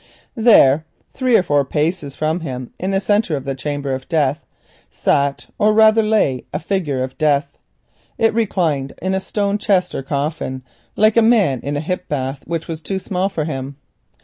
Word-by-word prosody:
There, 160 - +5 0.3
three 255 -3 +3
or - - +2
four 145 -4 +2
paces 150 0 -2
from 155 +2 -1
him, 130 -6 -6
in 185 - -2
the 195 0 +1
centre 205 -4 +1
of 135 - -7
the 135 - -2
chamber 140 +1 -3
of 130 0 -6
Death 150 -4 +1 0.5
sat 140 0 0
or 215 +1 +3
rather 220 0 +6
lay 215 - +1
a 150 - -2
figure 155 -6 -2
of 130 0 -7
Death. 145 -2 +1 0.6
It 225 -1 +2
reclined 170 -11 0
in 185 +2 -1
a 190 - +1
stone 200 +1 -1
chest 185 -4 +1
or - - -3
coffin, 140 -1 -3 0.3
like 215 +1 +3
a - - +7
man 215 - +3
in 145 +1 -3
a - - -2
hip 180 +3 -4
bath 135 -1 -3
which 165 -1 -3
is 160 -1 -5
too 190 +4 -3
small 190 0 -1
for 165 -6 -3
him. 135 -2 -5
160 Hz, 185 wpm, -19 LUFS, 140-195 Hz, 0.6 s, a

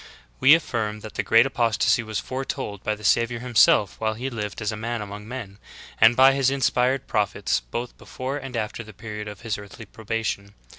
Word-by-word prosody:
^ - - -15
6. - - -16 0.3
We 140 +4 +8
affirm 110 -9 -2
that 110 - -9
the - - -1
great 115 +2 +5
apostasy 120 -2 +2
was 110 -3 -3
foretold 130 -6 -5
by 110 - 0
the 105 - -15
Savior 115 +3 +2
Himself 115 -4 +3
while 110 0 -1
He 130 +4 -4
lived 105 -3 -5
as 110 0 -1
a - - -4
Man 115 +2 -3
among 105 0 -7
men, 110 -5 -7 0.4
and 115 +1 +7
by 135 +1 +7
His 135 -1 +2
inspired 130 -1 +1
prophets 100 - 0
both 120 - -6
before 130 +2 -5
and 135 -4 -6
after 115 +1 -3
the 110 -1 -13
period 105 0 -7
of 105 -2 -9
His 110 -3 -3
earthly 105 +2 -11
probation. 110 -2 -4
115 Hz, 205 wpm, -24 LUFS, 105-125 Hz, 0.4 s, We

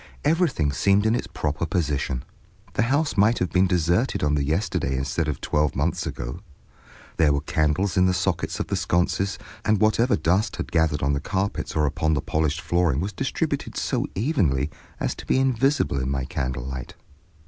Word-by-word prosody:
Everything 150 - +2
seemed 100 +8 +2
in 110 - +3
its 120 - -1
proper 75 +1 -3
position; 70 -7 -1 0.5
the - - +1
house 140 +6 +1
might 105 +4 +4
have 90 - -1
been 95 +1 +4
deserted 90 - +1
on 75 0 +2
the 70 -1 +1
yesterday 75 - 0
instead 70 +5 -1
of 75 -3 -2
twelve 75 -1 0
months - - -1
ago. - - -5 0.8
There 80 -3 +4
were 70 -1 +1
candles 75 +6 0
in 90 0 +5
the 90 - +2
sockets 95 -2 -1
of - - -1
the - - -2
sconces, 95 +3 0 0.3
and 110 -2 +2
whatever 115 +4 +3
dust 85 +7 +1
had - - -5
gathered 80 -3 +1
on 70 +1 +2
the 70 - 0
carpets 100 +1 -2
or 75 -1 +3
upon 80 +2 +1
the - - +1
polished 75 0 -1
flooring 85 -6 +1
was 95 +4 -3
distributed - - -2
so - - -1
evenly 85 - +1 0.3
as - - -1
to - - -10
be - - +3
invisible 135 - +2
in 65 0 -2
my 70 -1 -1
candlelight. 65 -3 -4
80 Hz, 180 wpm, -24 LUFS, 75-100 Hz, 0.8 s, in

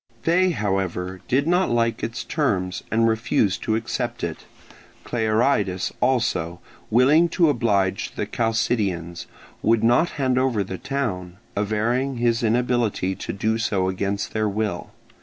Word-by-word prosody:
They, 180 +3 +3
however, 95 - -2
did 135 +3 +2
not 180 +3 +2
like 115 -1 +1
its 115 - -4
terms, 95 - -1
and 115 +1 +3
refused 110 -3 +1
to 110 - 0
accept 120 +1 -3
it; 85 -2 -4 0.6
Clearidas 110 -4 0
also, 90 -9 0 0.3
willing 145 +9 +5
to 170 -1 +3
oblige 100 -7 0
the - - -2
Chalcidians, 105 -7 -1 0.3
would 115 0 +2
not 120 +9 +4
hand 130 -2 +1
over 125 -6 +1
the 95 -1 -6
town, 95 -11 -3 0.2
averring 115 +6 0
his 120 0 +1
inability 115 -4 +1
to - - -5
do 110 +3 -1
so 95 -5 0
against 100 +2 -2
their 110 -1 0
will. 105 +1 -3
110 Hz, 135 wpm, -23 LUFS, 100-125 Hz, 0.6 s, willing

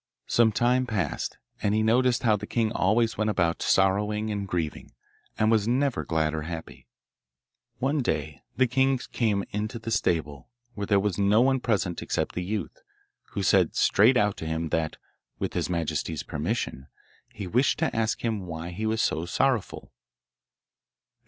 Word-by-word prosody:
Some 115 -2 +3
time 125 +3 +2
passed, 100 -10 -2 0.2
and 105 +1 +1
he 110 - +2
noticed 120 +2 +3
how 110 -3 +4
the 105 0 -6
king 115 -2 0
always 110 +2 +1
went 110 0 +1
about 85 -5 0
sorrowing 105 +3 +2
and 100 -1 -3
grieving, 85 -4 -4 0.4
and 110 +1 +3
was 110 -2 +2
never 130 +2 +1
glad 80 -1 0
or 80 - -2
happy. 80 +1 -8 0.9
One 140 +3 0
day 75 - -2 0.2
the 130 - +5
king 130 +2 +2
came 105 -4 +1
into 105 +3 -3
the 115 0 -6
stable, 75 - -1 0.2
where 100 -2 -4
there 100 -2 +4
was 100 -1 -1
no 100 +3 +4
one 130 +1 +3
present 100 -8 -1
except - - -2
the 90 - -3
youth, 100 0 -4 0.5
who - - -2
said - - +3
straight 120 +6 +4
out 105 -2 +2
to 80 - -5
him 80 0 -2
that, 80 -1 -1 0.4
with - - -3
his - - -1
majesty's 80 -2 -2
permission, 65 - -3 0.4
he 100 - -7
wished 125 +9 +2
to - - -1
ask 110 0 0
him 105 -5 -2
why 85 +1 -6
he 105 +5 -3
was 110 0 +1
so 80 +2 -1
sorrowful. 125 +3 -1
105 Hz, 165 wpm, -26 LUFS, 85-115 Hz, 0.9 s, the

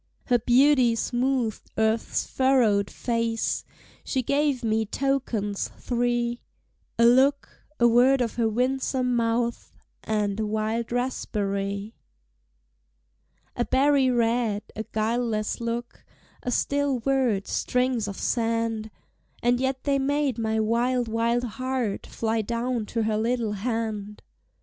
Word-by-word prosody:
Her 245 -2 +3
beauty 250 0 +4
smoothed 245 -1 -1
earth's 220 +1 +1
furrowed 240 -7 +2
face! 230 -1 -1 0.4
She 260 -2 -1
gave 280 -1 +1
me 220 0 +1
tokens 225 -4 -1
three: 240 -1 -1 0.6
A 235 - +5
look, 265 +4 +2
a 240 - +6
word 250 +3 +5
of 235 -3 -1
her 230 -2 +1
winsome 255 +1 0
mouth, 235 0 -1 0.3
And 210 -1 -1
a 220 - 0
wild 220 +2 -2
raspberry. 200 -4 -2 1.6
A 240 - 0
berry 275 +1 +3
red, 230 -3 +1
a 220 - -4
guileless 220 -1 -1
look, 235 +1 -4 0.4
A - - -3
still 280 +2 +1
word, 250 -7 +1
strings 250 -3 0
of 200 - -6
sand! 230 -2 -1 0.5
And 245 +1 +3
yet 265 0 -1
they 280 -1 +1
made 280 -2 0
my 220 -1 0
wild, 235 +2 +1
wild 230 +2 +1
heart 250 -2 -3
Fly 225 0 -1
down 235 0 -2
to 230 -1 -1
her 215 -1 0
little 230 -1 0
hand. 210 -1 -3
235 Hz, 120 wpm, -25 LUFS, 220-255 Hz, 1.6 s, a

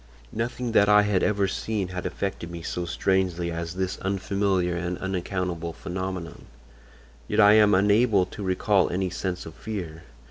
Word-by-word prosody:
"Nothing 120 +1 -3
that 100 -2 +4
I 105 0 +6
had 105 -3 +1
ever 100 -2 +2
seen 100 -1 -2
had 90 -1 -4
affected 95 -3 -4
me 85 -1 -7
so 90 +1 -3
strangely 90 -1 0
as 85 +1 -4
this 95 0 -2
unfamiliar 95 -2 0
and 90 0 -3
unaccountable 90 -3 -3
phenomenon, 95 -2 -5 0.8
yet 105 - 0
I 105 -1 +8
am 105 -2 +6
unable 100 0 +4
to 105 - -10
recall 95 +1 +2
any 95 0 -1
sense 90 0 -4
of 80 - -9
fear. 85 -6 -6
95 Hz, 155 wpm, -25 LUFS, 90-100 Hz, 0.8 s, I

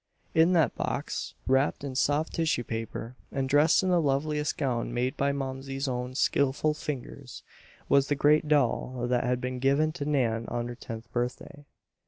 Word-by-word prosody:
In 165 +3 +5
that 160 -5 +3
box, - - -3
wrapped 135 +2 +2
in 140 -2 -4
soft 145 +4 +1
tissue 160 -7 0
paper, 115 +1 -5 0.2
and 135 -1 -1
dressed 145 +6 +4
in 185 - +1
the 175 -2 +4
loveliest 150 +1 0
gown 120 -5 -1
made 125 +3 0
by 140 -1 +1
Momsey's 135 0 -4
own 125 0 -3
skillful 140 +2 +2
fingers, 150 -4 -7 0.4
was 140 0 +4
the 145 - +1
great 150 +2 +3
doll 130 -3 +1
that 125 0 +1
had 125 -1 0
been 125 0 -4
given 140 +4 +2
to 150 -3 -5
Nan 120 -6 +1
on 120 0 -3
her 120 - -6
tenth 115 -2 -8
birthday. 125 +4 -4
135 Hz, 170 wpm, -28 LUFS, 125-150 Hz, 0.4 s, In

